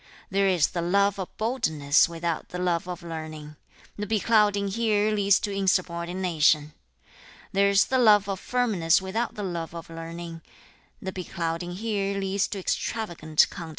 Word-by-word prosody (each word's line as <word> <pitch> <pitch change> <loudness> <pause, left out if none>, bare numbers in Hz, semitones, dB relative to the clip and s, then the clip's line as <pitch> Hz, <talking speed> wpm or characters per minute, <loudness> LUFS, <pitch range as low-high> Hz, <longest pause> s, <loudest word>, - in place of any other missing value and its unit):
There 195 +1 +2
is 180 -5 +3
the 175 - -3
love 200 +3 +2
of 185 - -3
straightforwardness 165 - +2
without 170 -1 -3
the 180 - -6
love 180 -1 0
of 180 -1 -6
learning; 155 -2 -7 0.4
the 210 - -3
beclouding 210 -2 +2
here 215 0 +1
leads 200 -2 +3
to 205 - -2
rudeness. 175 -4 +2 1.0
There 200 +1 +3
is 200 +1 +4
the 260 - +1
love 210 -4 +5
of 195 -1 -3
boldness 210 -10 +3
without 195 +5 -3
the 210 - -5
love 170 -3 -4
of 165 0 -8
learning; 165 0 -7 0.6
the 190 - -5
beclouding 175 -1 -4
here 200 -1 -2
leads 195 0 0
to 205 - -5
insubordination. 170 -10 0
190 Hz, 150 wpm, -26 LUFS, 170-205 Hz, 1.0 s, love